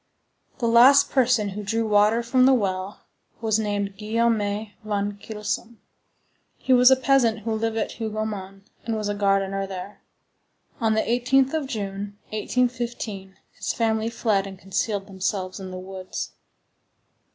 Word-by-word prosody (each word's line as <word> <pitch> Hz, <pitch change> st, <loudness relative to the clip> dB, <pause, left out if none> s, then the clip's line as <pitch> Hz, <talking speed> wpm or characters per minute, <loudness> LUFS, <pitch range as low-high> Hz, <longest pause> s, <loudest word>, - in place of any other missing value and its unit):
The 240 Hz, -3 st, -1 dB
last 250 Hz, +5 st, +6 dB
person 240 Hz, -6 st, +3 dB
who 200 Hz, +2 st, -5 dB
drew 225 Hz, +2 st, -1 dB
water 210 Hz, +2 st, +4 dB
from 255 Hz, +2 st, +4 dB
the 265 Hz, -, +6 dB
well 190 Hz, -3 st, -2 dB, 0.4 s
was 220 Hz, -1 st, +1 dB
named 205 Hz, -2 st, -2 dB
Guillaume 225 Hz, +1 st, +1 dB, 0.4 s
van 205 Hz, -1 st, -2 dB
Kylsom. 220 Hz, +2 st, -4 dB, 0.8 s
He 260 Hz, -, +1 dB
was 250 Hz, 0 st, +7 dB
a 265 Hz, -, +7 dB
peasant 255 Hz, -4 st, +2 dB
who 225 Hz, +1 st, -2 dB
lived 225 Hz, 0 st, -1 dB
at 220 Hz, -, -1 dB
Hougomont, 210 Hz, -3 st, -4 dB, 0.2 s
and 230 Hz, -1 st, -2 dB
was 210 Hz, -1 st, -2 dB
gardener 195 Hz, -1 st, 0 dB
there. 190 Hz, +2 st, -8 dB, 0.8 s
On 220 Hz, -2 st, +2 dB
the 220 Hz, -, +3 dB
18th 255 Hz, +3 st, +2 dB
of 310 Hz, -4 st, -1 dB
June, 200 Hz, -3 st, -5 dB
1815, 230 Hz, -4 st, -2 dB
his -, -, -3 dB
family 225 Hz, -1 st, 0 dB
fled 215 Hz, -4 st, 0 dB
and 190 Hz, -1 st, -9 dB
concealed 195 Hz, +2 st, -2 dB
themselves 190 Hz, 0 st, -3 dB
in 190 Hz, -1 st, -7 dB
the 185 Hz, -, -7 dB
woods. 185 Hz, 0 st, -6 dB
215 Hz, 140 wpm, -24 LUFS, 195-235 Hz, 0.8 s, was